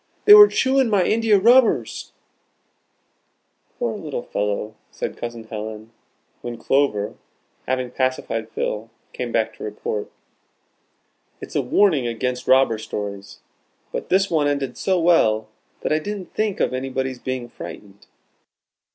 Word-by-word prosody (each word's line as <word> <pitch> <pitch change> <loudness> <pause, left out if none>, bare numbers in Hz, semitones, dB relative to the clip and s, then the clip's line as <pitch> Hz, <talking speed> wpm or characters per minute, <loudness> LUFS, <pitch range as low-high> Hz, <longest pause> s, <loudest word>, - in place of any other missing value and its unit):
They 415 - +10
were 415 0 +11
chewing 265 - +2
my 200 -4 +3
india 225 -2 +3
rubbers." 240 +5 +3 1.7
"Poor 235 -2 -2
little 150 -10 -5
fellow!" 105 +1 -2 0.2
said - - -5
Cousin 120 -1 -6
Helen, 110 0 -7 0.5
when 120 -1 -6
Clover, 115 -7 +1 0.5
having 130 -1 -1
pacified 130 -4 -2
Phil, 110 0 -3 0.2
came 120 -1 -4
back 110 -1 0
to - - -9
report. 105 0 -4 1.3
"It's - - -10
a - - +3
warning 160 -12 +2
against 125 +2 -3
robber 130 -4 +4
stories. 100 -2 -6 0.5
But - - -5
this 195 +1 +3
one 155 -3 +2
ended 140 -2 -2
so 190 -2 0
well, 110 -11 +3 0.3
that - - 0
I 155 - +2
didn't 200 +2 -6
think 215 -2 -1
of - - +1
anybody's 130 0 -3
being 130 -1 -4
frightened." 100 -3 -11
130 Hz, 130 wpm, -22 LUFS, -, 1.7 s, were